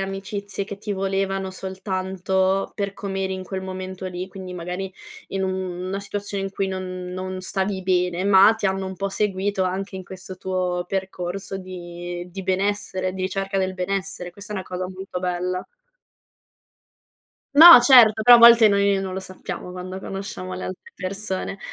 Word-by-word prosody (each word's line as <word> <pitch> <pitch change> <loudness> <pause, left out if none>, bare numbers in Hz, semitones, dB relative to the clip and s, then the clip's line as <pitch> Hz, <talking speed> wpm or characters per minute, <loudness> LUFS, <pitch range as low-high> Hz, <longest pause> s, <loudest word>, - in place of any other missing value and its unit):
amicizie 195 +1 -4
che 200 -1 -8
ti 205 0 -4
volevano 195 0 -1
soltanto 190 0 -1
per 200 -1 -3
com'eri 195 -1 -3
in 185 - -5
quel 190 0 -5
momento 185 0 -6
lì, 185 +1 -5
quindi, 185 -1 -8
magari, 180 +2 -5 0.4
in 195 0 -2
u 190 - 0
una 185 +1 -4
situazione 200 0 -4
in 195 - -4
cui 195 0 -2
non 185 -1 -5
non 185 0 -5
stavi 190 0 -2
bene, 180 0 +1
ma 200 +2 +7
ti 220 - -7
hanno 190 0 0
un 190 0 -6
po' 195 +1 -2
seguito, 195 -1 0
anche 190 +2 -3
in 185 - -7
questo 185 0 -10
tuo 180 -1 -2
percorso 190 0 -4
di 175 -1 -7
di 190 +2 -6
benessere, 190 -1 -1
di 190 - -7
ricerca 195 +1 -2
del 185 0 -1
benessere. 185 -1 -3
Questa 200 +4 -9
è - - -3
una 190 - -4
cosa 180 0 -4
molto 190 -1 -6
bella. 180 0 -2 1.9
No, 330 -2 +12
certo, 235 -4 +7
però 245 +2 +10
a - - +4
volte 235 -2 +9
noi 200 -1 +2
non 190 -1 -4
lo 190 - -3
sappiamo, 185 -1 -7
quando 185 +1 -6
conosciamo 140 - -6
le 90 - -6
altre 90 - -9
persone. 195 0 -4
190 Hz, 170 wpm, -23 LUFS, 185-195 Hz, 1.9 s, No